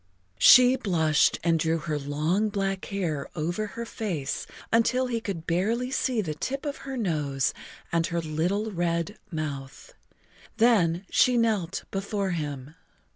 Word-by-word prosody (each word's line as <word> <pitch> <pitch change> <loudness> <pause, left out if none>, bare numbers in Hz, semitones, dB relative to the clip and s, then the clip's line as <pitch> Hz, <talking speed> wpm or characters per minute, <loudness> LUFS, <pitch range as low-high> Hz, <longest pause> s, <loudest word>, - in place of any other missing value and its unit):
She 250 0 +8
blushed 160 - +2
and 165 -1 +2
drew 160 +1 +1
her 155 -2 -3
long 155 +9 0
black 195 -2 -2
hair 165 -8 -3
over 175 +7 -2
her 235 +3 -6
face 180 -12 -4 0.3
until 250 +3 +3
he 235 -2 -2
could 185 -7 -5
barely 225 +9 0
see 255 -4 0
the 160 -6 -3
tip 270 - -4
of 285 -1 -3
her 265 - -4
nose 150 - 0 0.4
and 165 -1 +1
her 170 - -1
little 175 +7 -1
red 170 +2 -1
mouth. 150 - -6 0.6
Then 200 -6 +3
she 250 -1 +4
knelt 210 -6 0
before 195 0 -2
him. 145 -4 -4
180 Hz, 140 wpm, -27 LUFS, 160-220 Hz, 0.6 s, She